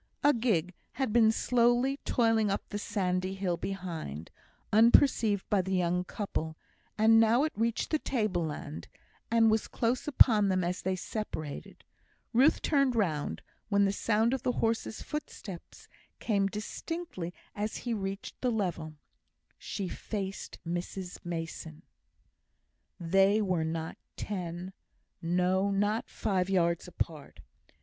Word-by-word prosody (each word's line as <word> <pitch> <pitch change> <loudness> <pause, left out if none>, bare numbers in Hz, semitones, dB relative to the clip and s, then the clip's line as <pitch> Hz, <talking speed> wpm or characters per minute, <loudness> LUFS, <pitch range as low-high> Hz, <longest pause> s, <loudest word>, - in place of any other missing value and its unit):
A 290 - +6
gig 205 -7 +1 0.2
had 255 -3 -1
been 225 -2 +6
slowly 245 +3 +2
toiling 225 -3 +2
up 200 - -2
the 205 - -3
sandy 185 -2 -1
hill 190 -3 -1
behind, 170 - -5 0.4
unperceived 225 -2 +5
by 205 -2 +3
the 190 +1 -2
young 180 0 +1
couple, 160 -6 -4 0.4
and 225 +1 +6
now 225 +4 +5
it 310 - -1
reached 230 +1 -1
the 310 - +2
table 215 -12 0
land, 150 -1 -6 0.4
and 225 -1 +5
was 220 0 +1
close 240 +4 -1
upon 225 -7 +6
them 185 -1 +1
as 180 +1 -2
they 190 0 0
separated. 180 -7 -6 0.5
Ruth 265 +7 +4
turned 275 -5 +2
round, 165 -10 -1 0.3
when 200 -1 +4
the 195 - +2
sound 220 +4 +1
of 265 - -1
the 250 - 0
horse's 225 -1 -1
footsteps 210 - -7 0.3
came 200 -3 +1
distinctly 215 - -5 0.2
as 210 +1 -2
he 240 - 0
reached 195 -1 -5
the 250 - +1
level. 170 -8 -2 0.6
She 195 - -4
faced 195 +1 -5
Mrs 180 +2 -4
Mason! 165 -2 -6 1.2
They 195 +4 +4
were 185 -6 +1
not 160 0 -3 0.2
ten 180 -2 -5 0.5
no, 180 +3 +2
not 205 +3 0
five 190 -4 -1
yards 170 -3 +1
apart. 160 -4 -5
200 Hz, 130 wpm, -30 LUFS, 180-225 Hz, 1.2 s, A